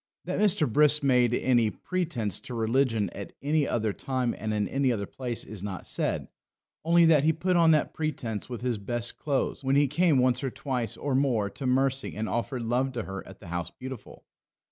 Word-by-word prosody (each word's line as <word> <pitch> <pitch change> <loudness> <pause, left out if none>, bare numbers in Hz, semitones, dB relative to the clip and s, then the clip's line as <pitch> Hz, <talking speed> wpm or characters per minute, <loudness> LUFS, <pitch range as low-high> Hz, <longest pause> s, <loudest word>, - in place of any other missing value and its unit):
That - - -2
Mr. 195 -7 +3
Brisk 150 +4 +4
made 125 -3 +4
any 120 -4 +3
pretence 155 - -3
to 125 - -8
religion 115 -3 +1
at 100 - -8
any 150 0 +2
other 110 -3 0
time 130 0 -1
and 110 +1 -4
in 105 -1 0
any 135 -1 +1
other 105 -4 -2
place 120 +2 -3
is 110 -4 -7
not 95 -2 -5
said; - - -1 0.6
only 170 +1 +5
that 155 -4 +5
he 160 - +4
put 180 +3 0
on 170 -1 +5
that 155 -2 +3
pretence 140 -10 -3
with 120 -2 -5
his 120 -4 -1
best 120 +3 -4
clothes 140 -1 -1
when 135 +1 +2
he 145 0 +4
came 160 +1 +3
once 125 0 +2
or 135 - 0
twice 130 -3 -3
or 140 -1 -2
more 125 -7 +1
to 135 - -5
Mercy 135 +1 +1
and 110 +1 -2
offered 120 +2 -2
love 125 +3 0
to 120 -3 -3
her 95 0 -6
at 95 - -12
the 95 - -11
House 85 -1 -3
Beautiful. 130 +3 -10
130 Hz, 205 wpm, -28 LUFS, 110-145 Hz, 0.6 s, only